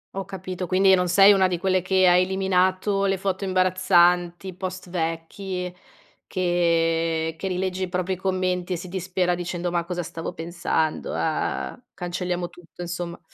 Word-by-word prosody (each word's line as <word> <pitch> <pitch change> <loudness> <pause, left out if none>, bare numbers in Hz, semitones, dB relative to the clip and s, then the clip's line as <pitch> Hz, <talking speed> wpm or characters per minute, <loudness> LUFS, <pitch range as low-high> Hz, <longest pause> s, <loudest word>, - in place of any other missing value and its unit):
Ho 195 -1 -3
capito, 185 -2 -5
quindi 190 +1 +4
non 180 -1 +3
sei 195 +3 +7
una 190 -1 +4
di 180 -1 -1
quelle 185 0 +1
che 185 +1 +3
ha 175 - +6
eliminato 190 +1 +2
le 195 -1 +1
foto 195 +1 -2
imbarazzanti, 185 -1 +2
post 185 -1 -6
vecchi 180 +2 -3 0.5
che 165 -2 +1
che 190 +4 -4
rilegge 185 0 -2
i 180 - -3
propri 185 +1 -1
commenti 185 -1 -1
e - - 0
si 180 +1 -8
dispera 180 -1 -1
dicendo: 175 0 -3
"Ma 170 -1 0
cosa 175 0 -3
stavo 165 +2 -6
pensando? 165 -1 -2
ah 160 -1 -1
ah - - -8
A 245 - -16
cancelliamo 180 -1 -3
tutto," 175 0 -11
insomma. 175 0 -5
180 Hz, 160 wpm, -24 LUFS, 175-185 Hz, 0.5 s, sei